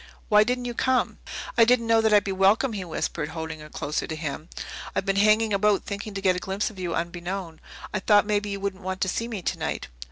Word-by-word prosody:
Why 210 0 +7
didn't 250 +2 -1
you 240 - -3
come?" 255 +1 +1 0.4
"I - - +9
didn't 235 0 +4
know 225 0 +4
that 220 -1 +2
I'd 205 -1 +6
be 200 - -2
welcome," 200 +6 +3
he 200 -3 -3
whispered, 160 -2 -3
holding 160 -1 -5
her 150 0 -11
closer 150 0 -3
to 160 - -4
him. 155 +1 -5 0.5
"I've - - 0
been 195 -1 +1
hanging 215 +1 +4
about 200 0 +3
thinking 200 0 -5
to 195 - -3
get 185 -2 +3
a - - -2
glimpse 195 +4 -2
of 200 - -13
you 175 -2 -2
unbeknown. 175 0 -4 0.3
I 210 - 0
thought 205 +2 +4
maybe 205 0 0
you 200 0 -3
wouldn't 195 -1 -3
want 185 0 -4
to - - +2
see 230 +5 -1
me 215 -6 -5
tonight." - - -3
200 Hz, 235 wpm, -26 LUFS, 180-215 Hz, 0.5 s, I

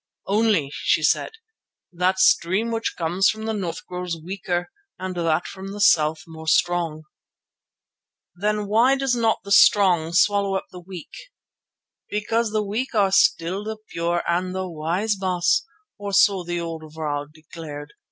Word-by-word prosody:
Only, 205 -8 +1
she - - +1
said, - - +1 0.6
that 180 +2 +1
stream 190 +5 +3
which 225 0 -2
comes 175 +3 +2
from 220 0 -3
the 220 - -1
north 180 -6 -4
grows 180 -2 -4
weaker 175 - -4 0.3
and 185 0 -5
that 165 -1 0
from 195 0 -8
the 205 - -7
south 160 -6 +3
more 160 -1 -11
strong." 165 -2 +1 1.3
"Then 210 +3 -1
why 230 +6 +4
does 270 -2 0
not 225 -2 +1
the 200 - -9
strong 185 -6 +5
swallow 200 +1 +3
up 190 - -2
the 180 - -9
weak?" 175 -2 -10 1.0
"Because 225 +2 0
the 215 0 0
weak 225 +5 -3
are 200 -2 +3
still 190 0 +2
the 220 +1 -5
pure 170 +1 -1
and 180 +2 -1
the 190 0 -3
wise, 175 +6 -1
Baas, 185 - +1 0.3
or 200 -1 -5
so 195 -1 +4
the 175 0 -3
old 165 -1 -5
vrouw 145 -2 -3
declared. 155 -2 -10
185 Hz, 150 wpm, -23 LUFS, 170-205 Hz, 1.3 s, strong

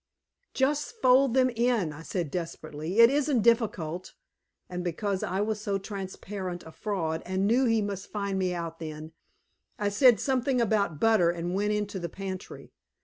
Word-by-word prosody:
"Just 290 - 0
fold 260 - +5
them 255 -1 +4
in," 235 -8 +1
I 150 - -10
said 165 -3 -3
desperately. 165 0 -5
"It 230 +2 +9
isn't 280 -5 +1
difficult." 195 -8 0 0.5
And 180 0 -5
because 190 +3 -2
I 190 +2 -1
was 210 0 -1
so 200 -2 -1
transparent 190 -2 -6
a 160 - -11
fraud 165 -5 -2
and 190 +2 -1
knew 245 +5 +3
he 225 -3 +2
must 200 -1 -5
find 200 -2 -2
me 185 -1 0
out 165 -1 -5
then, 155 -1 -7 0.7
I 205 -1 0
said 240 +3 +5
something 265 -1 +1
about 200 -8 +1
butter, 220 -5 +4
and 175 +1 -2
went 205 +2 +1
into 210 -2 -2
the 170 -1 -4
pantry. 190 +1 -7
200 Hz, 165 wpm, -28 LUFS, 175-230 Hz, 0.7 s, It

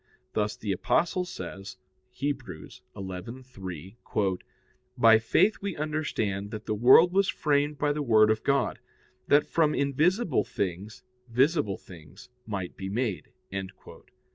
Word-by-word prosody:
Thus 105 -1 0
the 105 - -3
Apostle 175 - +1
says 95 - -8 0.4
(Heb. 140 -1 -1
11:3): 95 - -6 0.6
"By 115 -2 +7
faith 195 - +3
we 200 -3 -3
understand 135 -10 -2
that 110 0 -7
the - - -1
world 130 +11 +6
was 195 0 +3
framed 145 0 +1
by 145 0 +1
the 150 - -3
Word 110 -5 +5
of 110 0 0
God; 140 0 0 0.5
that 145 +1 +5
from 155 -2 +1
invisible 155 - +1
things 100 +3 -4 0.3
visible 130 - +2
things 85 +6 -14 0.2
might 95 -5 -4
be 95 0 -6
made." 105 - -2
115 Hz, 120 wpm, -28 LUFS, 100-150 Hz, 0.6 s, By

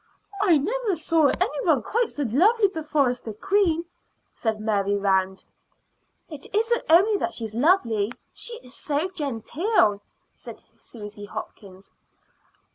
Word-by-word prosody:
"I 360 -6 +5
never 425 - -1
saw 320 -1 +2
any - - -1
one 305 - +2
quite 460 - 0
so 290 - -3
lovely 400 - +3
before 310 -6 0
as 245 0 -4
the 220 -2 -7
queen," 345 - +1 0.5
said 220 -2 -2
Mary 205 -2 0
Rand. 190 -1 0 0.8
"It 300 -4 -10
isn't 455 +2 +1
only 390 +6 +5
that 350 - -3
she's 225 -2 -6
lovely, 235 - +2 0.2
she 475 - -7
is 250 0 -11
so 300 +6 -2
genteel," 280 - 0 0.3
said - - -12 0.2
Susy 210 -2 -10
Hopkins. 195 -2 -10
290 Hz, 130 wpm, -24 LUFS, -, 0.8 s, I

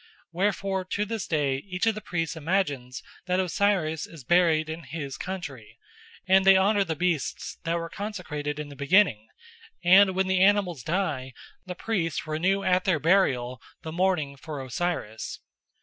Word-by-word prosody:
Wherefore 195 +1 0
to 200 +3 -2
this 220 0 -4
day 145 -4 +1
each 185 +6 -3
of 225 - +3
the 215 - -7
priests 165 -2 -3
imagines 145 -7 -2 0.2
that 180 0 +1
Osiris 180 -4 0
is 160 -5 -12
buried 165 0 +3
in 160 +1 -5
his 140 -1 -5
country, 145 - -7 0.5
and 190 +1 +5
they 195 0 +7
honour 200 +1 +3
the 165 -4 -3
beasts 170 -3 -2
that 165 +1 0
were 165 0 -4
consecrated 165 -8 -5
in 150 -1 -5
the 140 - -10
beginning, 140 - +3 0.6
and 190 +2 +6
when 190 0 +2
the 190 -1 +1
animals 190 -7 +3
die 150 -5 -2 0.3
the 180 - -5
priests 175 -7 -2
renew 180 +6 0
at 185 -1 +2
their 185 -4 +3
burial 130 -8 +2 0.2
the 160 - -5
mourning 170 -5 0
for 150 +1 -7
Osiris. 130 -5 -3
175 Hz, 160 wpm, -26 LUFS, 150-190 Hz, 0.6 s, they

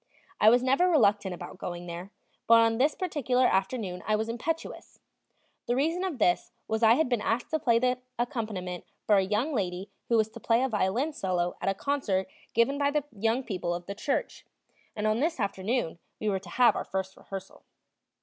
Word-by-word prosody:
I 215 - +7
was 245 +2 +4
never 275 +8 +3
reluctant 205 - +3
about 180 - -9
going 175 -1 -5
there, 175 +2 -7 0.4
but 230 - +8
on 225 0 +3
this 285 +3 +3
particular 260 -8 +1
afternoon 190 -2 0
I 215 - +3
was 220 +1 -2
impetuous. 305 +8 -4 0.7
The 240 - +1
reason 325 +7 +1
of 365 -7 -2
this 180 -6 +1 0.2
was 220 +1 -1
I 225 0 +7
had 320 +2 +2
been 245 -4 0
asked 235 +7 -1
to 315 - +1
play 235 -5 +3
the 250 +1 +1 0.2
accompaniment 215 -8 -3 0.2
for 210 - +5
a - - +5
young 215 +10 0
lady 190 -3 -2 0.2
who 235 - +4
was 220 0 +2
to - - -10
play 230 +2 +2
a 265 - +1
violin 225 +8 0
solo 180 -6 -1
at - - +1
a 195 - 0
concert 210 -8 -1 0.3
given 265 +5 +3
by 285 0 +3
the 295 0 0
young 225 +5 0
people 180 -6 -2
of 175 0 -7
the 200 - -5
church, 275 - -2 0.5
and 210 - -2
on 215 +1 +2
this 320 +1 0
afternoon 200 -2 -1 0.2
we 215 - -3
were 195 -2 0
to 185 -2 -13
have 245 +6 +4
our - - -2
first 190 0 -4
rehearsal. 195 -1 -9
225 Hz, 200 wpm, -28 LUFS, 190-260 Hz, 0.7 s, but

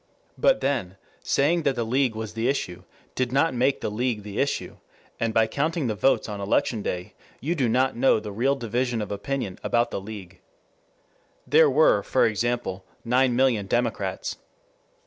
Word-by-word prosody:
But 270 - +3
then, 120 -9 -1 0.2
saying 160 +5 +2
that 140 -4 +1
the 120 - -1
League 125 0 +1
was 110 -1 -5
the 115 +1 -1
issue 90 -10 -3 0.3
did 130 -1 -1
not 140 +4 +2
make 130 +3 +1
the - - -2
League 115 -1 -1
the 105 0 -6
issue, 140 - -1 0.4
and 115 -1 0
by 110 0 +3
counting 150 +7 -1
the 115 - 0
votes 120 +7 +2
on 105 -2 -5
election 105 +2 0
day 90 +1 -4 0.3
you 155 +7 -1
do 135 -8 0
not 130 +3 +2
know 125 -1 +3
the 105 -1 -7
real 130 +7 +1
division 120 -1 -1
of 105 - -7
opinion 100 -1 -3
about 120 0 +1
the - - -3
League. 100 -3 -9 1.1
There 150 +3 +5
were, 140 -7 +4
for 130 - +2
example, 115 -3 -1 0.2
nine 125 +1 +3
million 120 -6 +2
Democrats. 120 +3 -1
120 Hz, 170 wpm, -25 LUFS, 105-135 Hz, 1.1 s, There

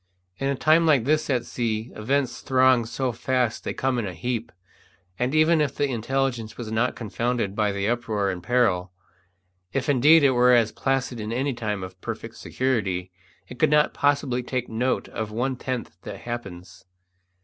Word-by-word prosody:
In 135 - -1
a 140 - +1
time 160 +4 +4
like 140 -7 +4
this 155 +4 +1
at 125 -3 +1
sea 115 -1 -3
events 130 +3 -1
throng 130 -2 +4
so 130 +2 -2
fast 125 -1 -1
they - - -3
come 130 -2 0
in 110 - -2
a 90 - -6
heap, 120 0 -3 0.7
and 125 +4 0
even 155 +1 +4
if 140 -3 -1
the 145 -1 0
intelligence 120 -2 -2
were 120 - -5
not 110 +3 +1
confounded 115 -2 -2
by 105 -1 +1
the 100 0 -2
uproar 110 -4 0
and 90 -1 -6
peril, 95 -4 +1 0.8
if 135 -1 -1
indeed 145 +4 +6
it 140 - +6
were 125 0 +5
as 115 -2 +3
placid 135 -2 -1
as 105 - -4
in 110 - -4
any 135 +4 -1
time 105 -5 -3
of 95 0 -10
perfect - - -6
security, 95 -9 -1 0.4
it 125 - -11
could 155 - +4
not 150 0 +3
possibly 140 -3 +1
take 125 0 -3
note 125 +3 -1
of 110 -1 -4
one 125 +5 -1
tenth 125 -2 -5
that - - -8
happens. 100 -7 -7
125 Hz, 180 wpm, -25 LUFS, 110-135 Hz, 0.8 s, indeed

